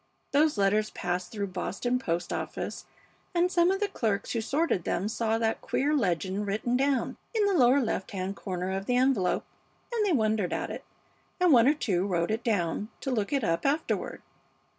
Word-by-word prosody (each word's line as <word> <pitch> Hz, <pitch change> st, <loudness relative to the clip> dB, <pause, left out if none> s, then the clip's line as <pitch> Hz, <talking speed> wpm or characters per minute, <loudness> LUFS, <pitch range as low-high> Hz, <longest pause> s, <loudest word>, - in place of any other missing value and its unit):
Those 295 Hz, -2 st, +3 dB
letters 210 Hz, +2 st, +2 dB
passed 180 Hz, -2 st, -3 dB
through 205 Hz, -2 st, -2 dB
the 190 Hz, -, -9 dB
Boston 245 Hz, +7 st, -1 dB
post 175 Hz, -7 st, -2 dB
office, -, -, -4 dB, 0.5 s
and 350 Hz, +1 st, +3 dB
some 345 Hz, -1 st, +4 dB
of 385 Hz, +1 st, +1 dB
the 415 Hz, -, +1 dB
clerks 220 Hz, -, -1 dB
who 230 Hz, -, 0 dB
sorted 275 Hz, -, 0 dB
them 190 Hz, +4 st, -1 dB
saw 220 Hz, 0 st, 0 dB
that 225 Hz, -1 st, 0 dB
queer 290 Hz, +3 st, 0 dB
legend 195 Hz, -, 0 dB
written 220 Hz, +5 st, 0 dB
down 270 Hz, 0 st, +1 dB, 0.2 s
in 430 Hz, -2 st, +3 dB
the 400 Hz, -, +2 dB
lower 260 Hz, -4 st, +5 dB
left 225 Hz, -6 st, -2 dB
hand 190 Hz, 0 st, -3 dB
corner 185 Hz, -2 st, -4 dB
of 195 Hz, +1 st, -4 dB
the 245 Hz, -, +2 dB
envelope, 250 Hz, -8 st, +2 dB, 0.5 s
and 455 Hz, -2 st, +1 dB
they 405 Hz, -, +2 dB
wondered 215 Hz, -, +1 dB
at -, -, -2 dB
it, -, -, -6 dB, 0.6 s
and 360 Hz, -4 st, +5 dB
one 235 Hz, -1 st, +6 dB
or 295 Hz, -, +5 dB
two 195 Hz, -9 st, 0 dB
wrote 175 Hz, -1 st, 0 dB
it 225 Hz, +2 st, -2 dB
down, 205 Hz, -1 st, 0 dB
to 270 Hz, -, -2 dB
look 215 Hz, -5 st, -1 dB
it 275 Hz, -4 st, +1 dB
up 165 Hz, -4 st, 0 dB
afterward. 295 Hz, +3 st, -1 dB
220 Hz, 195 wpm, -28 LUFS, 195-275 Hz, 0.6 s, one